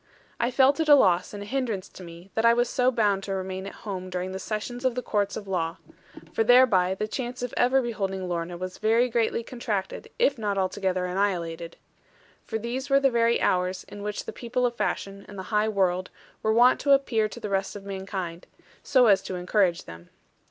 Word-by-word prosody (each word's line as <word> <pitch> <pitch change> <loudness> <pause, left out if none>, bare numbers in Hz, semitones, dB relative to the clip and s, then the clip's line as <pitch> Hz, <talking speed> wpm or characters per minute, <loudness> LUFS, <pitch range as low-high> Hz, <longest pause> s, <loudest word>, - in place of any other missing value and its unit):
I 235 - +1
felt 265 +4 +4
it 320 -1 0
a 290 - +10
loss, 180 -8 +3
and 205 -1 -7
a - - -8
hindrance 225 -5 -2
to 185 - -12
me, 170 +2 -12
that 225 - 0
I 230 0 +6
was 240 0 +2
so 250 +1 +2
bound 210 -5 +1
to 195 - -2
remain 190 0 -4
at - - -9
home 185 -3 -5
during 185 0 -3
the 190 - -5
session 230 +5 -4
of 255 -2 +1
the 250 - -3
courts 205 -1 -1
of 205 - -8
law; 170 -2 -2 0.6
for 225 - +2
thereby 220 -7 +5
the 215 +2 -3
chance 245 +1 -5
of 245 - -4
ever 255 +2 +3
beholding 195 -5 -3
Lorna 175 0 -3
was 185 +1 -6
very 230 +3 +3
greatly 230 0 0
contracted, 220 -6 -4
if 480 - +2
not 205 -2 -1
altogether 185 -1 -1
annihilated. 175 -3 -2 0.7
For 220 - -3
these 245 +5 -4
were 275 0 +5
the 270 -1 +3
very 235 0 +2
hours 180 0 0
in 205 - -10
which 210 0 -4
the - - -6
people 250 +1 -1
of 240 - 0
fashion, 200 -3 -3
and 205 - -11
the 190 - -5
high 210 +1 +3
world, 185 -3 0 0.3
were 220 - +1
wont 240 +3 +5
to 280 - +4
appear 230 -6 +2
to 235 - -9
the 215 -3 -5
rest 195 0 -1
of 200 - -8
mankind, 190 -3 -5 0.3
so 260 -3 +4
as 200 -4 +5
to 185 - -6
encourage 180 -1 +1
them. 85 +1 -12
205 Hz, 215 wpm, -26 LUFS, 185-240 Hz, 0.7 s, a